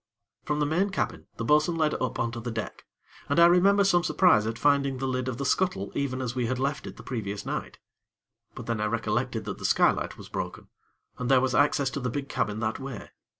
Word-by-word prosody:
From 150 0 -1
the 150 - +2
main 175 +7 +1
cabin, 195 - -3
the 115 - -3
bo'sun 150 +5 +3
led 155 -2 +1
up 130 - -2
on 115 - -1
to 120 - -6
the 120 +1 -5
deck, 115 -2 -6 0.4
and - - +2
I 170 - +9
remember 195 +4 +5
some 175 -3 +3
surprise 175 - +4
at 115 0 -3
finding 140 -1 +2
the 135 - -3
lid 130 0 -2
of 125 -2 -3
the 140 - -3
scuttle 135 - 0
even 130 -2 -2
as 120 -1 -3
we 125 -3 -1
had 130 +2 -1
left 140 +3 -2
it - - -9
the - - -11
previous 105 -5 -4
night; - - -4 0.8
but - - -7
then 115 -2 -2
I - - +1
recollected 115 +1 -1
that - - -5
the - - -10
skylight - - +2
was - - -10
broken, - - -6 0.5
and 125 0 -2
there 135 -1 +6
was 130 0 0
access 145 -2 +2
to 140 - -3
the 125 -1 -2
big 140 +3 -4
cabin 105 +1 -2
that 110 0 -1
way. 135 -5 -7
130 Hz, 235 wpm, -27 LUFS, 115-150 Hz, 0.8 s, I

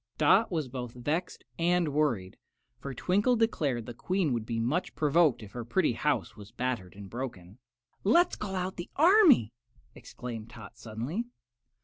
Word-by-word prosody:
Dot 190 +9 +4
was 160 -5 -1
both 125 -2 -6
vexed 150 +8 -3 0.2
and 175 -1 +2
worried, 120 -12 0 0.4
for 140 - -6
Twinkle 200 - +2
declared 150 - 0
the 120 - -7
Queen 180 +2 0
would 115 -2 -3
be 115 -1 -2
much 140 +11 -1
provoked 150 -4 +3
if 100 - -11
her 120 +1 -5
pretty 155 +4 +1
house 150 +5 -1
was 105 -2 -12
battered 120 -7 -3
and 100 0 -9
broken. 110 -4 -7 0.4
"Let's 340 - +4
call 195 -2 -5
out 185 0 -3
the 175 - -6
army," 320 - +6 0.4
exclaimed 115 -3 -8
Tot, 115 +1 -11
suddenly. 120 - -4
140 Hz, 155 wpm, -29 LUFS, 115-180 Hz, 0.4 s, army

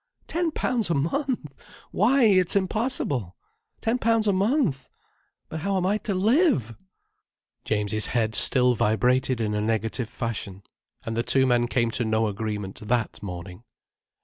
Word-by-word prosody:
Ten 340 0 -1
pounds 245 - -1
a 170 - +1
month! 165 - -2 0.4
Why 250 +6 +3
it's 185 -5 +4
impossible! 190 - -1 0.5
Ten 230 +3 0
pounds 225 -2 +2
a 205 - +3
month! 195 - 0 0.6
But 160 - -6
how 195 +4 -1
am 180 - 0
I 205 +3 +1
to 205 -3 -3
live?" 200 - +2 0.9
James's 110 0 0
head 110 -3 0
still 125 +3 +5
vibrated 125 +3 +1
in 105 -2 -1
a 105 - -1
negative 110 +2 -1
fashion. 115 -5 -5 0.4
And 115 - -3
the 115 - +1
two 130 +2 +2
men 120 -2 +2
came 120 -1 0
to 120 - -1
no 110 0 +1
agreement 105 -2 -4
that 115 +1 -2
morning. 90 +1 -8
125 Hz, 150 wpm, -25 LUFS, -, 0.9 s, still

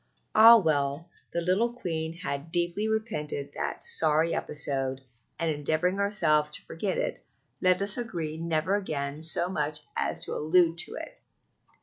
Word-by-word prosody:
Ah, 230 +2 +9
well! 155 -2 -1 0.2
the 170 - -2
little 190 +7 +1
Queen 165 -9 -4
had 160 -2 -5
deeply 175 +5 -1
repented 150 -11 -3
that - - -4
sorry 160 +1 +4
episode; 135 -3 -2 0.4
and 165 -1 -1
endeavoring 155 +6 -1
ourselves 165 -7 +2
to 150 - -6
forget 190 +3 -3
it, - - -3 0.4
let 185 +1 +3
us 200 +4 0
agree 170 -10 -4
never 165 +2 -1
again 150 -7 -3
so 170 +2 +3
much 150 -4 -1
as - - -1
to - - -5
allude 165 +2 +2
to - - +1
it. - - -9
165 Hz, 145 wpm, -27 LUFS, 150-185 Hz, 0.4 s, Ah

